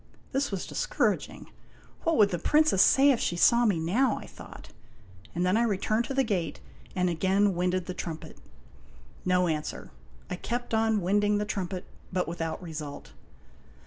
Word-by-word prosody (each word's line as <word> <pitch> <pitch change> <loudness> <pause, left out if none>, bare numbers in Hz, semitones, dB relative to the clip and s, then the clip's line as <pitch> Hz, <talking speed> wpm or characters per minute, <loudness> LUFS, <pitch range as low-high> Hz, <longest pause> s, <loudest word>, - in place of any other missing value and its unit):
This 275 +2 0
was 195 -3 -4
discouraging. - - -2 0.5
"What 330 - +1
would 210 -2 +6
the 175 - -2
Princess 300 - +3
say 275 +5 +6
if 245 - +1
she 175 - -1
saw 235 +7 +5
me 200 -5 +2
now?" 220 +10 +1
I - - -8
thought, - - -12 0.7
and 175 +1 0
then 185 +2 +2
I 225 - +3
returned 215 +1 +1
to 270 - -4
the 270 - +3
gate 180 - -2 0.4
and 180 -1 +1
again 190 +4 +2
winded 180 +1 0
the 185 - -5
trumpet. 165 -3 -7 0.9
No 180 0 +3
answer. 155 -2 -4 0.4
I 180 - -4
kept 240 +4 -4
on 220 -1 +2
winding 205 +3 +2
the 210 - -1
trumpet, 190 -3 -4 0.3
but 180 -1 -1
without 165 -1 -3
result. 155 -4 -7
190 Hz, 165 wpm, -28 LUFS, 175-225 Hz, 0.9 s, would